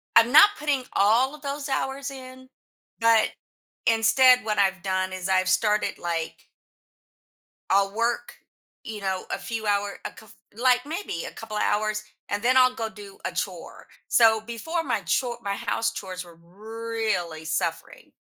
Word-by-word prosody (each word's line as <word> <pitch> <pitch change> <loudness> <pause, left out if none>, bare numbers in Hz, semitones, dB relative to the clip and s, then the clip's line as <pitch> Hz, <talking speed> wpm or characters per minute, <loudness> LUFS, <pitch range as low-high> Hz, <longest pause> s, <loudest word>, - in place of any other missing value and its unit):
I'm 230 +2 +6
not 315 +8 +9
putting 290 -3 0
all 230 +7 +3
of 300 - -16
those 285 0 -4
hours 270 +1 -2
in, 260 -1 -11 0.5
but, 230 -1 +4 0.6
instead 250 +2 +5
what 215 -1 -1
I've 190 -1 +2
done 185 0 -1
is 185 -1 -4
I've 185 -1 +2
started, 210 +3 +1
like 165 -2 -4 1.2
I'll 195 0 +2
work, 235 +1 -1 0.5
you 215 -2 -7
know, 190 -1 -2
a - - -1
few 225 -1 -5
hour 205 -1 0
a - - -3
coup 220 - -16 0.3
like, 250 +2 +2
maybe 315 - -4
a - - -7
couple 215 -1 -7
of - - +1
hours, 215 0 0 0.3
and 205 +1 -2
then 255 +2 +4
I'll 255 0 +5
go 225 -3 -3
do 205 -2 -12
a - - -1
chore. - - -6 0.2
So 225 -2 +5
before 320 +9 -3
my - - -1
chore 245 -2 -1
my 200 -2 -2
house 225 - -1
chores 185 -2 -6
were 170 -1 -15
really 215 -3 -4
suffering. 160 - -3
220 Hz, 160 wpm, -25 LUFS, 195-255 Hz, 1.2 s, not